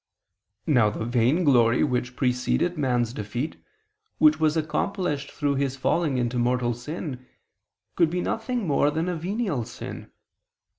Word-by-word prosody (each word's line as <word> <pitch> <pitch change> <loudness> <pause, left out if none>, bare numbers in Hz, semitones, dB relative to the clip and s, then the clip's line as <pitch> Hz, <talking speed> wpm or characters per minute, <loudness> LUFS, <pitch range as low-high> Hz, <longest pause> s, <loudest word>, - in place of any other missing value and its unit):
Now 120 -8 +4
the 110 +1 -4
vainglory 120 0 +3
which 125 -2 -1
preceded 130 +7 0
man's 125 -5 0
defeat, 120 +7 -4 0.6
which 155 0 +5
was 155 0 +2
accomplished 160 -2 -1
through 145 -2 -1
his 135 -1 -1
falling 145 +1 +1
into 120 0 0
mortal 120 0 +1
sin, 130 0 -6 0.7
could 170 -3 +3
be 180 +2 -2
nothing 230 +2 -2
more 145 -2 +3
than 160 +3 -1
a 180 - -1
venial 180 - -2
sin. - - -8
140 Hz, 135 wpm, -25 LUFS, 125-160 Hz, 0.7 s, which